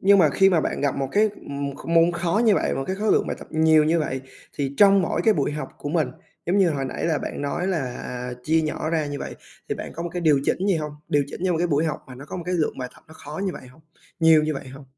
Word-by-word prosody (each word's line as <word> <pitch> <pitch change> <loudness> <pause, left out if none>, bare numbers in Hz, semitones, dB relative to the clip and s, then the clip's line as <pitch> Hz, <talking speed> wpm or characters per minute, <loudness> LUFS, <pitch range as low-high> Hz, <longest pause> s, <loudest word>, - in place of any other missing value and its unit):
nhưng 200 +1 +6
mà 160 -5 +6
khi 195 +6 +4
mà 170 -4 +3
bạn - - -2
gặp 140 -1 0
một 135 -1 -1
cái, 215 +1 +4
ừm, 140 -4 -5
kh - - -11
môn 165 +1 +4
khó 175 +4 0
như 215 -3 +5
vậy, - - 0
một 135 - -2
cái 190 - -2
khối 215 +1 +2
lượng - - +2
bài - - -3
tập - - -11
nhiều 160 -1 +4
như 165 +2 +2
vậy, 135 -4 -2 0.4
thì 140 -1 -2
trong 200 -1 +6
mỗi 165 - -1
cái 220 - +5
buổi 145 -1 0
học 150 -3 -4
của 145 - -5
mình, 155 -4 +1 0.4
giống 185 +4 +2
như 185 -3 +4
hồi 140 -3 -2
nãy 130 - -4
là 160 -3 +1
bạn - - -5
nói 160 +5 -2
là, 185 -4 0 0.2
à, 125 0 -5
chia 160 +1 +3
nhỏ 155 0 -2
ra 160 -3 0
như 145 0 -4
vậy, - - -6 0.3
thì - - -1
bạn - - -7
có 170 - -4
một 175 - -3
cái 175 - -3
điều 155 -5 +4
chỉnh 190 - 0
gì 190 - +3
hông? 150 -1 -4 0.2
Điều 145 -1 +2
chỉnh 140 - -9
cho 185 - +2
một 165 - 0
cái 175 - +2
buổi 155 -1 +1
học 155 -3 -2
mà 130 - -10
nó 135 +3 -10
có 150 - -7
một 175 - -5
cái 180 - 0
lượng 160 -3 0
bài 125 -1 -4
tập - - -20
nó 160 - -14
khó 150 +3 -8
như 185 - -1
vậy 130 - -10
hông, 140 +6 -19 0.4
nhiều 160 -1 +6
như 155 0 -1
vậy 135 -1 -7
hông? 135 +2 -11
160 Hz, 310 wpm, -24 LUFS, 145-175 Hz, 0.4 s, nhưng